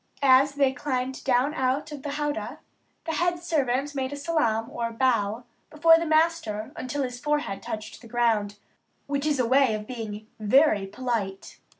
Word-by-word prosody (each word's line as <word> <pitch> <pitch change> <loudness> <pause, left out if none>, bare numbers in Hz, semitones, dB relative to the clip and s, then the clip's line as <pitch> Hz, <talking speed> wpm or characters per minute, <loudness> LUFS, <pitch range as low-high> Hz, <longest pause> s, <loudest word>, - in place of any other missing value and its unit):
As 275 +1 +5
they 275 -2 +2
climbed 260 -1 -3
down 260 +3 +2
out 265 +2 -1
of 290 -2 -7
the 290 - -5
"howdah," 295 +1 -3 0.5
the 325 - -2
head 345 +2 +1
servant 290 -5 -1
made 265 -1 -2
a - - -4
"salaam," 280 -7 0
or 230 -1 -3
bow, 230 -2 +1 0.3
before 325 +2 +5
the 335 - -2
master 310 -10 +1
until 275 +2 -3
his 250 -1 -5
forehead 295 -9 -1
touched 215 0 -7
the 235 - -13
ground, 220 -4 0 0.5
which 280 +1 -2
is 290 -3 +1
a 250 - +3
way 260 -2 +3
of 210 0 -6
being 220 -3 -6
very 215 -2 +3
polite. 205 -3 -4
260 Hz, 170 wpm, -26 LUFS, 225-295 Hz, 0.5 s, As